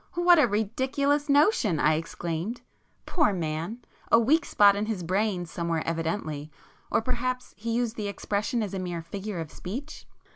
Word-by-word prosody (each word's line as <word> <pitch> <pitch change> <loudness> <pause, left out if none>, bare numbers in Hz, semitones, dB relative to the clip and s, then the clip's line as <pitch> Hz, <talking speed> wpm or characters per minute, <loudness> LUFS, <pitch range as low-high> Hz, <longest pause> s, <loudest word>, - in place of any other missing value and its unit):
"What 350 -1 +6
a 275 - +5
ridiculous 265 +8 0
notion!" 280 - +4
I 155 +2 +4
exclaimed—"Poor 175 - -3
man!—a 170 +8 -1
weak 295 +9 +3
spot 200 -1 +5
in 210 +1 -2
his 210 -6 -2
brain 185 +1 0
somewhere 165 -1 -2
evidently,—or 160 +1 -3
perhaps 250 +1 -2
he 230 +2 -3
used 235 -1 -1
the 210 -2 -2
expression 210 +4 -1
as 200 -2 -5
a 190 - -2
mere 175 -2 -4
figure 195 +2 -5
of 160 -3 -6
speech?" 265 +12 -7
205 Hz, 145 wpm, -27 LUFS, 170-250 Hz, -, What